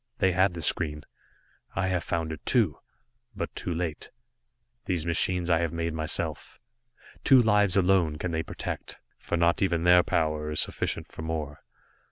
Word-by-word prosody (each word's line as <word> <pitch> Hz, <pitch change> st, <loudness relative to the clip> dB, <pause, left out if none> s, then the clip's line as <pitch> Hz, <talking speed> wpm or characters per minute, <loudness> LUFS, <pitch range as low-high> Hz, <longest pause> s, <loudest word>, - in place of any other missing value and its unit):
They 95 Hz, -, +2 dB
had 95 Hz, 0 st, +2 dB
the 85 Hz, -, -6 dB
screen, 75 Hz, -1 st, +2 dB, 0.7 s
I 95 Hz, -1 st, 0 dB
have 90 Hz, -2 st, -1 dB
found 80 Hz, -1 st, -2 dB
it, 80 Hz, -, -8 dB
too -, -, +2 dB, 0.6 s
but 100 Hz, -, -4 dB
too 90 Hz, -, -4 dB
late. 85 Hz, -2 st, -3 dB, 0.8 s
These 85 Hz, -4 st, -1 dB
machines 85 Hz, +1 st, +2 dB
I 85 Hz, -2 st, +3 dB
have 85 Hz, -2 st, -1 dB
made 85 Hz, -1 st, -3 dB
myself. 80 Hz, -1 st, -2 dB, 0.6 s
Two 135 Hz, -2 st, +6 dB
lives 105 Hz, -5 st, +3 dB
alone 90 Hz, -4 st, +3 dB
they -, -, -8 dB
can 80 Hz, -1 st, -2 dB
protect, -, -, -6 dB, 0.2 s
for 85 Hz, -, -3 dB
not 85 Hz, 0 st, +2 dB
even 85 Hz, -4 st, +1 dB
their 90 Hz, 0 st, +6 dB
power 75 Hz, -3 st, -1 dB
is 75 Hz, -, -1 dB
sufficient -, -, -1 dB
for -, -, -10 dB
more. 80 Hz, -2 st, -5 dB
85 Hz, 165 wpm, -27 LUFS, 80-90 Hz, 0.8 s, Two